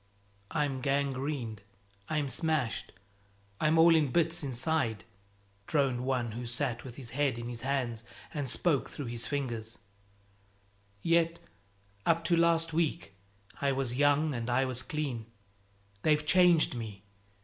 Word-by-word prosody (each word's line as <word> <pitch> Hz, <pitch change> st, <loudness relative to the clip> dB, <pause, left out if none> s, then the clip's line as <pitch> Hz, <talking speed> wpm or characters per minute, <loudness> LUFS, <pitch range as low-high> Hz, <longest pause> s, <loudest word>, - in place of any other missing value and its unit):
"I'm 145 Hz, -4 st, -1 dB
gangrened, 135 Hz, -5 st, -1 dB, 0.5 s
I'm 150 Hz, -2 st, 0 dB
smashed, 140 Hz, -3 st, -1 dB, 0.7 s
I'm 155 Hz, +1 st, +3 dB
all 165 Hz, 0 st, +7 dB
in 150 Hz, -5 st, +2 dB
bits 170 Hz, +2 st, +1 dB
inside," 130 Hz, -4 st, 0 dB, 0.6 s
droned 135 Hz, -5 st, +1 dB
one 125 Hz, -3 st, 0 dB
who 120 Hz, +2 st, -5 dB
sat 120 Hz, 0 st, -1 dB
with 125 Hz, -3 st, -9 dB
his 125 Hz, -3 st, -7 dB
head 135 Hz, -2 st, 0 dB
in 120 Hz, 0 st, -5 dB
his 120 Hz, -1 st, -5 dB
hands 125 Hz, -4 st, -1 dB, 0.3 s
and 145 Hz, -4 st, -2 dB
spoke 145 Hz, +2 st, +2 dB
through 145 Hz, -, -6 dB
his 115 Hz, 0 st, -1 dB
fingers; 120 Hz, -6 st, -3 dB, 1.3 s
"yet 170 Hz, 0 st, +3 dB, 0.7 s
up 165 Hz, +5 st, +2 dB
to 170 Hz, 0 st, +3 dB
last 165 Hz, -1 st, +3 dB
week 160 Hz, -, -1 dB, 0.5 s
I 140 Hz, -1 st, +2 dB
was 130 Hz, -3 st, -1 dB
young 145 Hz, +3 st, +3 dB
and 120 Hz, -1 st, -3 dB
I 130 Hz, +2 st, +2 dB
was 130 Hz, -1 st, +1 dB
clean. 135 Hz, -8 st, -3 dB, 0.7 s
They've 150 Hz, +2 st, +2 dB
changed 175 Hz, -3 st, +5 dB
me. 110 Hz, -5 st, -7 dB
140 Hz, 135 wpm, -31 LUFS, 120-155 Hz, 1.3 s, all